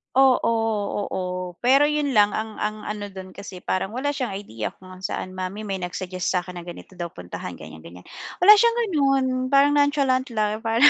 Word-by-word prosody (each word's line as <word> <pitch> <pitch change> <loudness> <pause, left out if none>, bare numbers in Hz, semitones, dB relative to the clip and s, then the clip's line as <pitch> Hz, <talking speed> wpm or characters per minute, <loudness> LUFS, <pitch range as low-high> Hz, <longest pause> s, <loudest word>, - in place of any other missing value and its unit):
Oo, 265 -3 +5 0.6
oo, 180 -1 -4
pero 275 +4 +5
'yon 300 -2 0
lang, 205 -3 +4
ang 220 0 -4
ang 215 0 -3
ano 210 -1 -4
do'n, 190 -1 -10
kasi 185 -2 -10
parang 195 +4 -2
wala 285 +3 0
siyang 255 -8 -3
idea 115 - -5
kung 185 0 -13
saan, 185 0 -4
"Mommy, 185 +3 -5
may 195 -2 -3
nag-suggest 180 0 -4
sa'kin 180 0 -3
na 175 - -11
ganito 175 +1 -11
daw 175 - -2
puntahan, 90 - -8
ganyan-ganyan". 80 +3 -12 0.4
Wala 415 - +10
siyang 470 0 +4
gano'n, 275 -6 +2 0.2
parang 280 +2 +5
nonchalant 285 -3 +2
lang, 215 0 0
parang, 225 +3 +1
205 Hz, 175 wpm, -24 LUFS, 185-265 Hz, 0.6 s, Wala